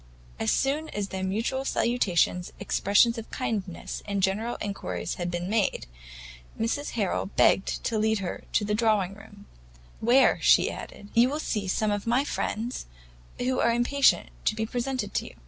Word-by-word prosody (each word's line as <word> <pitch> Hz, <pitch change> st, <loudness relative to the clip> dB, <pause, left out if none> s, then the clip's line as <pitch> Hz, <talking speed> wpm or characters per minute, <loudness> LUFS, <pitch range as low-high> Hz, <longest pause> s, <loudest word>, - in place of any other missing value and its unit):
As 110 Hz, -, 0 dB
soon 295 Hz, +4 st, +1 dB
as 205 Hz, -1 st, -3 dB
their 190 Hz, 0 st, -4 dB
mutual 225 Hz, +8 st, -1 dB
salutations, 190 Hz, -9 st, +1 dB
expressions 230 Hz, +4 st, +3 dB
of 225 Hz, -, -9 dB
kindness, 205 Hz, -8 st, -4 dB
and 200 Hz, -2 st, -1 dB
general 215 Hz, +5 st, 0 dB
inquiries 200 Hz, -1 st, -4 dB
had 175 Hz, -, -1 dB
been 175 Hz, 0 st, -3 dB
made, 210 Hz, -, 0 dB, 0.7 s
Mrs 245 Hz, +6 st, -1 dB
Harrel 205 Hz, -5 st, -1 dB
begged 195 Hz, 0 st, +2 dB
to 220 Hz, -, 0 dB
lead 220 Hz, +1 st, +2 dB
her 190 Hz, -3 st, -5 dB
to 210 Hz, -, +2 dB
the 210 Hz, -, -1 dB
drawing 210 Hz, -4 st, +2 dB
room, 205 Hz, 0 st, -14 dB, 0.5 s
"where," 245 Hz, +4 st, +4 dB
she -, -, +5 dB
added, 205 Hz, -, -9 dB
"you 235 Hz, +2 st, +5 dB
will 295 Hz, +2 st, -2 dB
see 210 Hz, -9 st, -2 dB
some 210 Hz, +3 st, +1 dB
of 205 Hz, +1 st, -2 dB
my 245 Hz, +4 st, +3 dB
friends, 235 Hz, -, -3 dB, 0.5 s
who 255 Hz, +1 st, 0 dB
are 235 Hz, -, +3 dB
impatient 245 Hz, +4 st, +3 dB, 0.2 s
to 215 Hz, -, +2 dB
be 220 Hz, 0 st, -1 dB
presented 245 Hz, -3 st, -3 dB
to -, -, -1 dB
you." -, -, -13 dB
220 Hz, 165 wpm, -27 LUFS, 200-240 Hz, 0.7 s, she